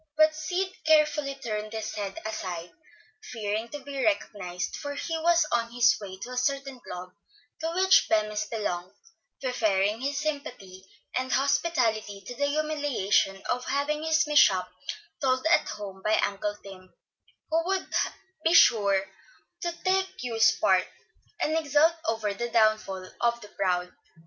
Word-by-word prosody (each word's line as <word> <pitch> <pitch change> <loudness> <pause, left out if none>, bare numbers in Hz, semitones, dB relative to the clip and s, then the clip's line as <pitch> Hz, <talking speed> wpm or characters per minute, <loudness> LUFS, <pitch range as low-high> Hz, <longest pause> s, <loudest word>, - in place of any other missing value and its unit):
But 310 0 +6
Sid 355 +5 -2 0.2
carefully 300 -3 +3
turned 215 -4 -4
his 220 -1 -4
head 200 -2 -4
aside, 180 -5 -4 0.6
fearing 220 0 -3
to 295 - -6
be 275 -1 -4
recognized; 185 - -1
for 285 -1 -5
he 330 +3 -3
was 340 0 +4
on 235 -1 0
his 245 0 +4
way 190 -2 -7
to 250 - -7
a 250 - -5
certain 275 -1 -1
club 180 -5 -8 0.5
to 325 +1 -2
which 380 +1 +5
Bemis 215 -1 +1
belonged, 185 -5 -3 0.4
preferring 215 -4 +1
his 280 +1 -1
sympathy 215 -11 -5 0.3
and 255 0 -1
hospitality 250 -8 +1
to 245 - -6
the 285 +3 0
humiliation 285 -10 0
of 250 0 -1
having 295 +2 -1
his 315 -1 +2
mishap 195 -12 +4 0.5
told 260 0 +1
at 340 +2 +3
home 200 -2 -7
by 215 +1 +3
Uncle 205 +1 -1
Tim, 185 -2 -12 0.6
who 325 +1 +2
would 385 0 -2 0.5
be 330 +1 +4
sure 200 - +5 0.5
to 345 - -1
take 380 0 +2
Hugh's 225 -3 +3
part, 185 -1 +3 0.5
and 310 - 0
exult 310 +1 +4
over 220 -2 0
the 240 +4 -3
downfall 215 -4 +1
of 235 0 +2
the 210 - -11
proud. 180 -2 -1
235 Hz, 145 wpm, -27 LUFS, 200-300 Hz, 0.6 s, But